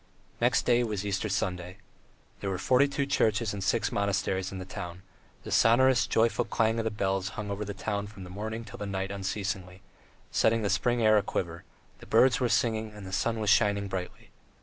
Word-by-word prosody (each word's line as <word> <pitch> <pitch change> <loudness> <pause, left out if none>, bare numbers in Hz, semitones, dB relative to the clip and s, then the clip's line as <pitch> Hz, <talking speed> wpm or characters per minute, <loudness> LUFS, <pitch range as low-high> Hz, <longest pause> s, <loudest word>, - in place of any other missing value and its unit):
Next - - +3
day 120 0 +4
was 105 -3 -3
Easter 100 +1 -1
Sunday. 90 -1 -2 0.6
There 100 - -3
were 95 - -2
forty 130 +9 +3
two 140 0 -1
churches 110 -5 +1
and 100 -1 -4
six 115 +3 +1
monasteries 95 -2 -1
in 95 - -6
the 95 - -6
town; 90 0 -7 0.4
the - - -7
sonorous, 120 -1 +4
joyful 115 +1 +2
clang 115 0 +1
of 115 - -2
the - - +2
bells 95 -2 -1
hung 105 -1 -4
over 100 +1 -3
the 100 -1 -6
town 100 0 -3
from 100 -2 -11
morning 110 +5 -5
till 105 -1 -8
night 95 -1 -3
unceasingly, 95 -1 -4 0.5
setting 115 0 +2
the 100 - +1
spring 120 +3 +1
air 110 -1 +6
aquiver; 85 -3 -4 0.3
the - - -13
birds 130 -1 +4
were 125 -2 +1
singing, 110 -3 0
the 95 0 -8
sun 115 +3 0
was 105 -2 +2
shining 100 -2 +3
brightly. 95 -2 -6
105 Hz, 190 wpm, -29 LUFS, 95-115 Hz, 0.6 s, air